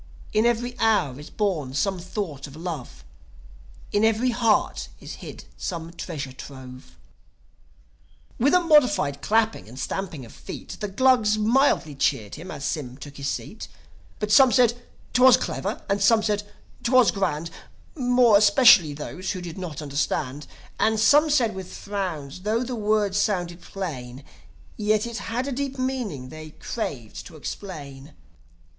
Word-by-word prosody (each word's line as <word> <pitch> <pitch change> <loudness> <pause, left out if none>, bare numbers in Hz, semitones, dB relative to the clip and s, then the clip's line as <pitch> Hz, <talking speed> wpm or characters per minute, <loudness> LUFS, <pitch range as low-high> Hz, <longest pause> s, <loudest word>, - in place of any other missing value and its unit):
In 215 +2 +3
everv 240 +1 0
hour 205 - +2
is 150 - -10
born 160 -11 -2
some 190 +5 0
thought 170 -6 -5
of 140 - -12
love; 160 -6 -6 0.9
In 205 - +2
every 225 +3 +3
heart 230 -2 +1
is - - -9
hid - - -9
some 170 -2 -5
treasure 150 -6 -5
trove.................... 130 -1 -11 1.4
With 280 +8 +4
a 360 - +5
modified 275 - +3
clapping 220 - +1
and 125 - -12
stamping 155 -2 -4
of 115 - -14
feet - - -8
The 210 - -2
Glugs 215 0 +3
mildly 220 - +2
cheered 135 -7 0
him, 170 +5 -8
as 145 -5 -6
Sym 130 -5 -3
took 145 0 -10
his 140 -1 -4
seat. 215 - -5 0.5
But 210 -1 -3
some 265 +2 +7
said 245 -2 +5 0.4
'twas 255 0 +7
clever, - - -3
and 200 0 0
some 220 +2 +5
said 205 -1 -1 0.3
'twas 245 -5 +5
grand 170 -4 -2 0.4
More 245 -5 +5
especially 205 - +6
those 175 +5 -6
who 185 - -5
did 175 +1 -7
not 160 -5 -5
understand. 140 -1 -2 0.3
And 220 0 +2
some 295 +8 +5
said, 245 -7 +2
with 190 -1 -8
frowns, 180 -7 -4
tho' 220 +4 0
the 250 0 -4
words 210 -2 +1
sounded 180 -5 -1
plain, 135 -9 -6 0.5
Yet 215 0 +1
it 235 -1 -5
had 245 +4 -3
a - - -2
deep 275 +1 -3
meaning 245 - -3
they 155 +1 -9
craved 140 - -5
to - - -13
explain. 145 -4 -8
195 Hz, 150 wpm, -25 LUFS, 150-225 Hz, 1.4 s, some